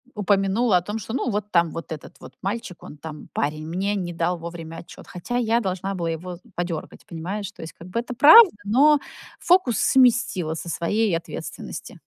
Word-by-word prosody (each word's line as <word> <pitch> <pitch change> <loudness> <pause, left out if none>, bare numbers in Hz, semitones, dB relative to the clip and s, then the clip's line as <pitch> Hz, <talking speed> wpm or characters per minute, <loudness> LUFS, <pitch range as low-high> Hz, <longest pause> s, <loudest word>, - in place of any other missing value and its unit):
упомянула 200 +1 +2
о 175 - 0
том, 210 +5 -5
что 220 - -7
ну 255 -1 -1
вот 210 0 -3
там 170 -2 +3
вот 165 - -7
этот 155 -2 -8
вот - - -12
мальчик, 200 -2 -5
он 150 - -11
там 155 0 -9
парень, 155 +2 -2
мне 195 +5 -1
не 175 -3 -3
дал 170 +1 -1
вовремя 165 -1 -8
отчет, 170 - -12
хотя 245 +8 -4
я 230 -1 +2
должна 195 -2 -3
была 170 -2 -2
его 175 +2 -5
з 170 - -18
подергать, 175 -2 -5
понимаешь? 185 +4 -5
То - - -14
есть, 160 - -8
как 170 - -13
бы 230 +6 -1
это 245 +1 -5
правда, 345 - +9
но 280 +8 +4 0.4
фокус 345 - +3
сместила 235 -10 +3
со 170 - -6
своей 195 +4 0
ответственности. 165 - -8
190 Hz, 195 wpm, -23 LUFS, 170-225 Hz, 0.4 s, правда